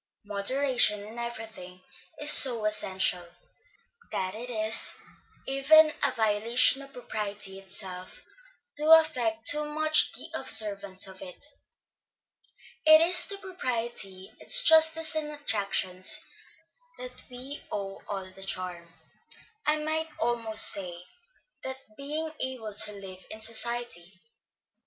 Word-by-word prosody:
Moderation 210 +1 +1
in 225 +3 -11
everything 220 -6 -9 0.4
is 295 0 +3
so 235 -7 +6
essential, 190 -4 0 0.9
that 185 0 -3
it 235 +3 -8
is 220 -2 -2 0.5
even 305 +3 +4
a 280 - +2
violation 230 +4 +3
of 275 0 -12
propriety 205 -5 -7
itself 190 -1 -7 0.5
to 305 +1 -2
affect 245 -9 +1
too 300 +1 +6
much 310 +1 +2
the - - -10
observance 205 -9 +2
of 190 -1 -8
it. 180 +9 -10 1.4
It 315 0 +7
is 350 +2 +2
to 400 - -6
propriety, 235 - -4
its - - +7
justice 320 -2 +4
and 310 -1 -3
attractions, 200 -8 -1 0.7
that - - -7
we 255 +3 -7
owe 195 -1 -6
all 195 -2 -6
the 195 - -14
charm, 180 -3 -3 0.8
I 305 0 +2
might 315 +1 -3
almost 230 -6 0
say, 180 -3 +4 0.6
the 265 0 -6 0.2
being 305 +4 -6
able 245 -5 -6
to 210 - +2
live 190 -2 -12
in 215 - -10
society. 220 -5 -1
230 Hz, 115 wpm, -26 LUFS, 195-295 Hz, 1.4 s, It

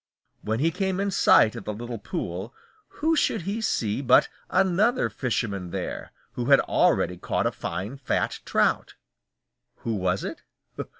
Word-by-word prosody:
When 110 +2 -2
he 165 +4 +2
came 190 +1 -1
in 200 0 0
sight 110 - +5
of 115 - -8
the 105 - -3
little 120 +1 -6
pool, 95 +2 -5 0.3
who 320 +2 0
should 220 - +1
he 200 +5 -3
see 115 - 0
but 130 -2 +5 0.2
another 195 +6 +2
fisherman 105 -8 -2
there, - - -5 0.2
who 120 0 -4
had 140 +1 +6
already 90 - +2
caught - - -1
a - - +2
fine 105 +9 -5
fat 135 - -1
trout. - - +1 0.9
Who 115 - -1
was 95 -2 -1
it? - - -6
125 Hz, 155 wpm, -25 LUFS, -, 0.9 s, had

